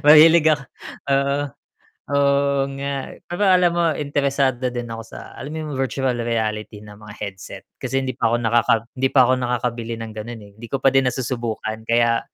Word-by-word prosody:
Mahilig 160 +2 +8
ako 150 -3 +2 0.5
oo, 140 +1 +2 0.7
oo 140 0 +2 0.2
nga, 140 0 -4
pero 175 +3 -4
alam 180 -2 +5
mo 170 0 +1
interesado 140 -3 0
din 120 -1 -4
ako 115 0 -6
sa - - -8 0.2
alam 130 - -7
mo - - -5
'yung 150 - -5
virtual 135 0 0
reality 110 -2 -2
na 105 -1 -12
mga 105 0 -11
headset 95 -2 -8 0.2
kasi 135 0 -1
hindi 130 - -2
pa 115 - 0
ako 115 - +2
nakaka 115 +1 +4 0.2
hindi 130 +1 +1
pa 130 - +4
ako 125 - +3
nakakabili 120 -1 -2
ng 115 -1 -7
gano'n, 110 +2 -7
eh. 100 - -15
Hindi 120 - -8
ko 135 - -1
pa 135 - +6
din 135 -1 +4
nasusubukan 115 -4 -3
kaya, 115 0 +3
125 Hz, 185 wpm, -21 LUFS, 115-140 Hz, 0.7 s, Mahilig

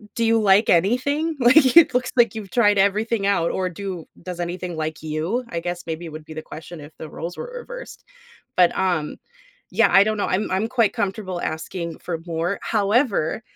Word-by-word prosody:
"Do 230 - 0
you 225 0 +3
like 205 +1 +4
anything?" 265 - +2
Like, 260 +2 +5
"It 330 -6 +8
looks 250 0 0
like 240 -2 +3
you've 210 -3 -7
tried 205 -4 +3
everything 205 +2 +1
out, 185 -4 +2
or 185 -1 -1
do 180 -2 -6 0.2
does 180 -1 -6
anything 175 0 -4
like 155 0 -4
you?" 160 +10 -2
I 170 - -3
guess 175 +1 -5
maybe 165 +1 -5
would 155 0 -9
be 155 - -10
the 155 - -5
question 165 +1 -10
if 145 +1 -11
the 160 - -7
roles 170 +3 -6
were - - -6
reversed. - - -10 0.5
But, 180 -1 +4
um 175 -5 -1 0.5
Yeah, - - +4
I 195 - +8
don't 215 0 -1
know, 205 - -1
I'm 195 +3 -1
I'm 190 +4 0
quite 230 -4 +2
comfortable 190 -3 -3
asking 165 +1 -4
for 170 -2 -4
more, 170 +4 -2
however, 210 - +1
190 Hz, 195 wpm, -22 LUFS, 170-225 Hz, 0.5 s, It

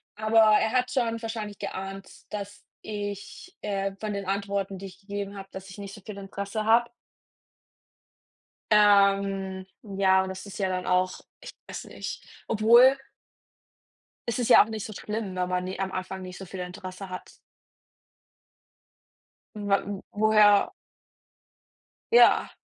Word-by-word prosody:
aber 220 +1 +3 0.2
er 220 0 +1
hat 250 0 +1
schon 230 -3 0
wahrscheinlich 220 -2 -5
geahnt, 195 0 -6 0.3
dass 205 0 -6 0.2
ich, 205 - -7
äh 195 -1 -2
von 215 -1 -3
den 200 -1 -4
Antworten, 195 0 -2
die 195 - -8
ich 185 0 -14
gegeben 200 0 -5
habe, 195 0 -9
dass 190 0 -9
ich 185 - -11
nicht 200 -1 -7
so 210 - -11
viel 200 +1 -9
Interesse 200 +2 -4
habe. 235 +2 +4 1.8
Ähm, 195 -2 +3 0.2
ja, 190 -2 +3
und 190 - -5
das 190 +1 -7
ist 200 - -9
ja 190 -2 0
dann 185 0 -2
auch 185 0 +1 0.2
ich - - -9 0.2
weiß - - -7
nicht. - - -7 0.2
Obwohl 235 +5 +6 1.3
es 235 +2 -1
ist 245 0 0
ja - - +9
auch 215 - -11
nicht 220 -2 -4
so 215 - -7
schlimm, 210 -2 -4
wenn 180 0 -1
man, 180 0 0
ne 185 0 -5
am 190 0 -2
Anfang 185 0 -5
nicht 180 -1 -8
so 190 - -8
viel 185 +1 -8
Interesse 185 +1 -7
hat. 185 - -8 2.2
Wa 205 -2 +1
w 200 -1 -5
woher. 210 -1 +5 1.4
Ja. 475 - +6
200 Hz, 150 wpm, -27 LUFS, 190-215 Hz, 2.2 s, ja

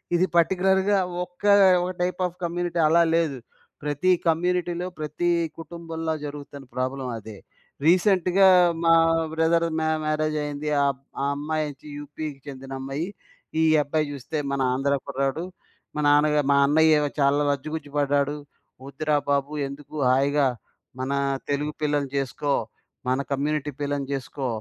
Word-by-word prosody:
ఇది 180 - +3
పర్టిక్యులర్‌గా 190 +3 +3 0.3
ఒక్క 180 +3 -12 0.4
ఒక 180 - -2
టైప్ 180 +1 -1
ఆఫ్ 175 - -12
కమ్యూనిటీ 175 0 -2
అలా 170 +2 +5
లేదు. 155 -5 +1 0.5
ప్రతీ 150 +5 +1 0.2
కమ్యూనిటీలో, 175 +1 0
ప్రతీ 155 +3 -1 0.3
కుటుంబంలో 165 -1 -5
జరుగుతున్న 145 -1 -8
ప్రాబ్లమ్ 130 0 -2
అదే. 105 -1 -10 0.5
రీసెంట్‌గా 185 +1 +4 0.4
మా 165 - +6 0.4
బ్రదర్ 165 +1 +2
మ్యా 160 0 +1
మ్యారేజ్ 155 0 0
అయింది. 145 +1 -4
ఆ - - +3 0.4
ఆ - - +1
అమ్మాయోచ్చి 150 -1 -3
యు‌పి‌కి 145 0 -7
చెందిన 135 -1 -9
అమ్మాయి, 135 +5 -3 0.5
ఈ - - +4 0.2
అబ్బాయి 150 +1 -1
చూస్తే 140 +3 -5 0.2
మన 140 - -1
ఆంధ్ర 140 +2 +1
కుర్రాడు. 140 +3 -1 0.5
మా 150 - -2
నాన్నగా 150 +1 +4
మా - - +5
అన్నయ్యేమో 155 0 +4
చాలా 140 +1 +3
లజ్జుగుజ్జు 145 +1 -5
పడ్డాడు. 145 0 +1 0.5
వద్దురా 150 +2 -1
బాబు 140 +1 0
ఎందుకు 140 +2 -10
హాయిగా, 140 +2 +3 0.5
మన 130 +1 -2 0.4
తెలుగు 145 +1 -1
పిల్లని 145 -2 0
జేసుకో, 140 +1 -2 0.6
మన 130 +1 +2
కమ్యూనిటీ 150 +1 -1
పిల్లని 145 -1 -1
జేసుకో, 135 0 -4
150 Hz, 130 wpm, -25 LUFS, 140-165 Hz, 0.6 s, మా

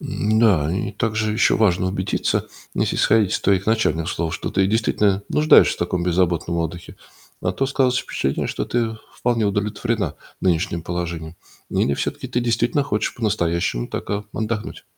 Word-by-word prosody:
М, 110 +1 0
да, 90 -10 +4
и 100 - -2
также 110 0 -1
ещё 110 -2 +3
важно 95 -4 +2
убедиться, 95 +1 -1 0.3
если - - 0
исходить 110 -3 +3
из - - 0
твоих 95 -1 +2
начальных 90 -8 +1
слов, 85 -2 -2
что - - -4
ты 95 0 +2
действительно 105 -2 +1
нуждаешься 155 +1 +5
в - - -16
таком 85 0 -1
беззаботном 85 -1 +1
отдыхе. 85 +1 -4 0.4
А - - -1
то 135 - 0
складывается 130 -2 +1
впечатление, 70 +1 -1
что - - -3
ты 115 -2 -1 0.2
вполне 120 -2 0
удовлетворена 105 +2 -1 0.3
нынешним 85 -2 0
положением. 85 -1 -4 0.3
Или 70 - +1
всё-таки - - -3
ты 120 - 0
действительно 120 +3 +1
хочешь 110 -6 -1
по-настоящему 85 - 0
так, - - -5
э, 105 0 -1
отдохнуть? 110 -1 -4
100 Hz, 160 wpm, -22 LUFS, 85-110 Hz, 0.4 s, нуждаешься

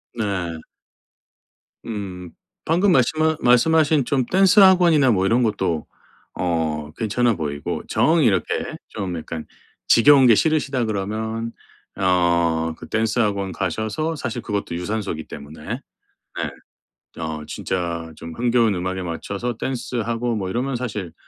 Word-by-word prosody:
네. 95 -7 -3 1.2
음. 95 -6 -6 0.3
방금 180 +5 +3
말씀하 155 +3 +2
말씀하신 150 +4 +4
좀 130 0 0
댄스 195 - +4
학원이나 175 -8 +6
뭐 95 -3 +2
이런 115 +5 +3
것도 95 -8 -1 0.5
어 80 -3 -2
괜찮아 115 +1 +1
보이고 75 -4 -4
정 160 +2 +3
이렇게 95 -7 0
좀 95 -3 -4
약간 80 0 -6 0.4
"지겨운 135 +2 +7
게 115 - +7
싫으시다." 140 -3 +1
그러면 110 +2 -3 0.4
어 85 -3 +2
그 - - -10
댄스 110 +2 0
학원 100 -4 0
가셔서 110 - -2
사실 130 -5 -4
그것도 100 -5 -3
유산소이기 90 -3 -3
때문에 75 +1 -10 0.7
네. - - -5 0.6
어 80 -1 -4
진짜 85 -3 -3
좀 80 0 -8
흥겨운 120 -2 +2
음악에 95 +1 -3
맞춰서 100 +7 -4
댄스하고 120 -2 -2
뭐 95 -3 -3
이러면 125 +6 -2
사실 105 -8 -4
110 Hz, 265 characters per minute, -22 LUFS, 90-125 Hz, 1.2 s, 지겨운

